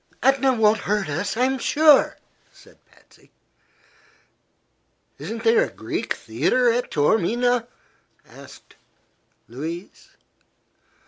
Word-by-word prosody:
"Etna 270 0 +3
won't 220 -2 +2
hurt 205 -5 -2
us, 180 +9 -3
I'm 260 +2 0
sure," 300 0 +4 0.3
said - - -21
Patsy. - - -26 1.9
"Isn't 225 0 -7
there 225 -1 +4
a - - -4
Greek 110 - -4
theatre 165 - 0
at 245 +2 -2
Taormina?" 230 +10 +1 0.6
asked - - -16 0.7
Louise. 160 - -8
225 Hz, 90 wpm, -22 LUFS, 170-250 Hz, 1.9 s, sure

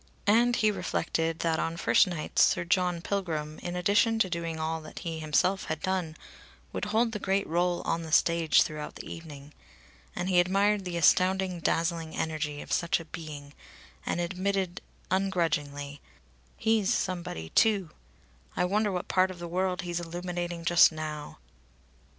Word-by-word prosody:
And 235 +4 +4
he 215 -2 +3
reflected 165 -4 -2
that 165 -1 +1
on 165 0 -2
first 170 - +4
nights 170 -4 -1
Sir - - +4
John 180 -1 +1
Pilgrim, 160 -6 -3
in 175 0 -5
addition 205 +5 +3
to 190 -5 +1
doing 165 -1 -3
all 160 +1 -2
that 155 - -12
he 165 -1 -3
himself 160 +5 +1
had 160 -1 -3
done, 180 -3 -2 0.6
would - - -2
hold 225 +3 +1
the 210 - -4
great 195 0 0
rôle 175 +1 0
on 170 - 0
the 160 -1 -7
stage 170 0 +4
throughout 150 -1 -6
the - - -8
evening. 150 -3 -10 0.6
And 175 - -2
he 185 -2 +4
admired 195 +2 +2
the 175 -1 -3
astounding, 185 +2 +3
dazzling 165 -1 -1
energy 155 -2 -2
of - - -13
such 170 0 +1
a 165 - -9
being, 150 -3 -8 0.5
and - - -2
admitted 185 +1 -1 0.3
ungrudgingly: 150 -7 -1 0.6
"He's 220 -3 +2
somebody 175 - -2
too! 200 - +2 0.7
I - - +2
wonder 205 +3 +1
what 180 -1 -3
part 185 0 +3
of 185 - -8
the 170 0 -6
world 180 +1 -1
he's 175 -1 -2
illuminating 175 0 -4
just 175 0 +6
now!" 155 -1 -6
175 Hz, 160 wpm, -28 LUFS, 160-190 Hz, 0.7 s, just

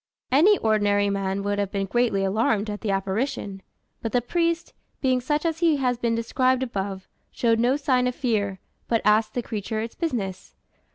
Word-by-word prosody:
Any 355 +10 +6
ordinary 205 -2 +2
man 195 0 -2
would 205 0 -1
have 200 -2 0
been 195 -1 -1
greatly 225 -2 +1
alarmed 210 +1 +1
at 205 - -6
the 220 - -3
apparition; 195 +1 -2 0.4
but 225 - -4
the 250 - +4
priest, 335 +4 -1 0.3
being 255 -2 +1
such 295 +5 -1
as 325 -1 0
he 330 -4 +3
has 250 -3 0
been 235 -1 +1
described 255 +3 +1
above, 195 -5 -4 0.2
showed 230 -2 +1
no 245 +3 +3
sign 255 -4 +2
of 250 - -2
fear, 210 -7 -1 0.3
but 230 -1 +1
asked 215 +1 +3
the 245 - -1
creature 215 -1 -4
its 225 +1 -4
business. 200 - -4
225 Hz, 180 wpm, -25 LUFS, 200-255 Hz, 0.4 s, Any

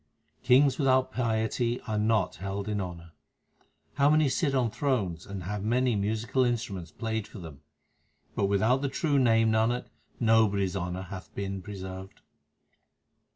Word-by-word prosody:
Kings 130 +2 +4
without 130 -2 +3
piety 115 0 0
are 110 -3 -2
not 105 -8 +1
held 95 +3 -4
in 105 -1 -1
honour: 85 -2 -7 0.9
How 140 0 +5
many 155 -1 +4
sit 140 +1 0
on 120 -4 +1
thrones 100 - -1
and 100 -2 -6
have 105 +3 -4
many 120 +2 +2
musical 110 +5 0
instru 120 -3 0
ments 90 -4 -6
played 110 0 -3
for - - -12
them! 80 -6 -10 0.7
But 100 - +1
without 110 +7 +2
the 140 - -1
true 145 0 +1
Name, 115 -3 +4
Nanak, 115 +3 +1 0.3
nobody 110 -4 +3
s 95 - -4
honour 90 0 -3
hath 95 0 -9
been 100 -1 -4
preserved. 95 -1 -8
110 Hz, 155 wpm, -28 LUFS, 95-125 Hz, 0.9 s, How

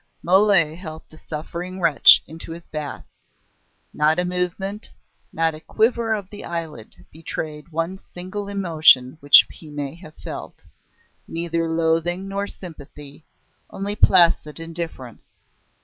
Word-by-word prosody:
Mole 185 -3 +4
helped 160 -2 -10
the 155 - -15
suffering 170 +5 -7
wretch 165 -5 +6
into 165 +1 -7
his 170 +1 -10
bath. 150 -3 -7 0.9
Not 155 +2 +2
a 180 - 0
movement, 180 +3 -3 0.4
not 165 0 0
a 155 - -9
quiver 225 +5 +1
of 200 -3 -6
the 205 - -9
eyelid 160 -9 -7
betrayed 155 0 -6
one 165 +4 -3
single 185 +3 -6
emotion 160 -9 +4
which 145 -1 +8
he 160 - -13
may 145 -1 -5
have 160 -2 -14
felt - - -9 0.6
neither 165 0 -2
loathing 165 +3 0
nor 200 +1 -3
sympathy, 150 -5 -11 0.4
only 200 +1 -4
placid 170 -6 +4
indifference. 165 -7 -4
165 Hz, 125 wpm, -22 LUFS, 155-185 Hz, 0.9 s, which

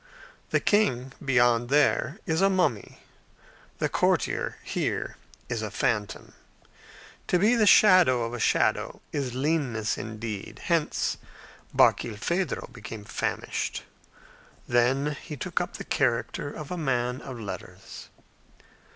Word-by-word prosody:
The - - +2
king, 135 - +1
beyond 120 -2 +3
there, 145 +1 +2
is 160 +1 0
a 195 - +5
mummy; 180 - -1 0.7
the - - 0
courtier, - - 0
here, - - -2 0.3
is 115 -2 -2
a 110 - -3
phantom. 105 0 -2 0.9
To 180 - +3
be 210 +6 +4
the 220 -3 +3
shadow 180 - +6
of 115 +1 -4
a 120 - -4
shadow - - +1
is 130 -4 -3
leanness 130 -6 0
indeed. 110 -2 -6
Hence 170 -3 0 0.5
Barkilphedro 130 - +1
became 115 -3 -8
famished. - - -3 0.8
Then 135 +5 +2
he 150 -4 -8
took - - -2
up - - -5
the - - -6
character 145 - -1
of 150 0 -8
a 180 - -3
man 125 -3 -1
of 130 -3 -8
letters. 105 -3 -8
130 Hz, 120 wpm, -27 LUFS, 115-160 Hz, 0.9 s, shadow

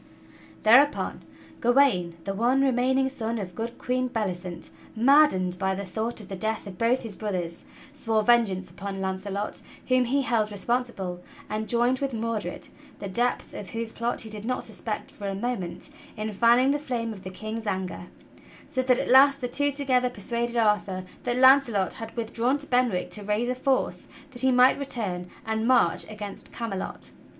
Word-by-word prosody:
Thereupon 270 +7 +4 0.4
Gawain, 235 -10 +3
the 195 - -3
one 245 +6 +2
remaining 265 +1 +2
son 235 -4 -3
of 190 -4 -5
good 230 +5 -5
Queen 255 0 -1
Belli 215 -6 -1
cent, 175 -1 -6 0.2
maddened 225 -8 +4
by 190 0 0
the 200 +1 -4
thought 220 +6 -3
of 210 - -8
the 195 - -5
death 220 +4 -2
of 185 -3 -9
both 240 +3 +2
his 220 -4 -2
brothers, 180 -6 -4 0.3
swore 220 -1 0
vengeance 200 -6 +2
upon 195 +2 -6
Launcelot 195 +2 -3 0.3
whom 255 0 +4
he 275 +3 +1
held 225 -4 +1
responsible, 205 -4 -2 0.3
and 215 0 -3
joined 240 +2 +2
with 275 -3 -2
Mordred, 220 -5 -3 0.3
the 200 - -6
depth 240 +6 0
of 195 - -7
whose 230 +2 -3
plot 235 +1 -2
he 220 - -6
did 210 -1 -7
not 250 +2 -2
suspect 215 -2 -6
for 200 - -6
a 195 - -2
moment, 200 -5 -4 0.3
in 215 0 -3
fanning 240 +5 +5
the 290 - 0
flame 235 -5 -3
of 195 - -11
the 185 - -7
King's 215 +3 -6
anger, 185 -2 -3 0.6
so 260 - -1
that 255 -1 +3
at - - -2
last 275 +2 +7
the 250 - -2
two 285 +3 +1
together 260 -3 +1
persuaded 235 +2 -3
Arthur 210 -4 +1 0.2
that 240 0 -1
Launcelot 260 -7 +5
had 225 +1 -8
with 230 -1 -3
drawn 245 +4 +2
to 290 - -5
Benwick 245 -9 +1
to 210 - -1
raise 210 +4 0
a - - +1
force 260 +1 0 0.2
that 245 -2 +1
he 260 0 +4
might 250 +2 +5
return 200 -10 -3 0.2
and 220 0 -1
march 240 -11 +3
against 210 -2 -6
Camelot. 225 -5 -5
230 Hz, 180 wpm, -26 LUFS, 200-250 Hz, 0.6 s, last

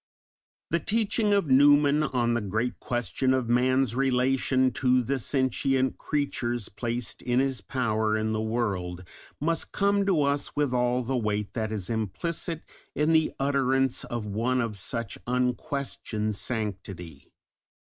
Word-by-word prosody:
The 170 - +2
teaching 215 +3 +1
of 200 -3 +3
Newman 145 +2 +5
on 125 -5 +1
the 120 - 0
great 110 +5 -2
question 125 +2 0
of 130 -3 -1
man's 130 0 +2
relation 130 0 +2
to 125 +1 +2
the 135 +3 -1
sentient 130 +1 0
creatures 120 -6 -1
placed 120 +3 -4
in 125 0 +1
his 135 -4 0
power 110 -1 0
in 110 0 -1
the 110 0 -1
world, 100 -6 -2 0.4
must 165 +2 -1
come 200 0 +2
to 170 -7 +3
us 140 0 -1
with 145 -3 +1
all 125 0 +1
the 130 +3 -2
weight 105 -3 -1
that 110 -2 -2
is 105 -4 -3
implicit 155 - -3 0.3
in 150 +2 +2
the 160 -1 +3
utterance 135 -2 +1
of 120 -3 -4
one 115 +5 0
of 115 -3 -1
such 105 +3 -4
unquestioned 125 -3 -1
sanctity. 95 - -4
125 Hz, 140 wpm, -27 LUFS, 110-140 Hz, 0.4 s, Newman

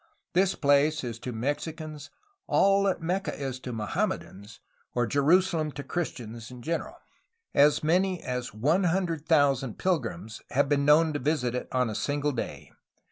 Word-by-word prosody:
This 185 +1 +3
place 145 +1 +3
is 115 -2 -5
to 125 - -5
Mexicans 145 +4 -4 0.4
all 195 0 +4
that 190 -3 0
Mecca 185 +4 -1
is 135 -2 -4
to 130 - -6
Mohammedans, 105 -1 -3 0.4
or 120 0 +2
Jerusalem 155 +4 +2
to 140 - -6
Christians 120 -8 -5
in 125 -1 -11
general. 165 +4 -3 0.6
As 145 +2 +4
many 180 +3 +2
as 125 -1 -3
100,000 155 - +1
pilgrims 115 - -2
have 140 +2 +2
been 140 0 +1
known 155 +2 +5
to 145 - -2
visit 135 -4 0
it 125 - -3
on 125 -1 +1
a 110 - -3
single 145 +5 -1
day. 125 - -5
145 Hz, 145 wpm, -28 LUFS, 125-165 Hz, 0.6 s, known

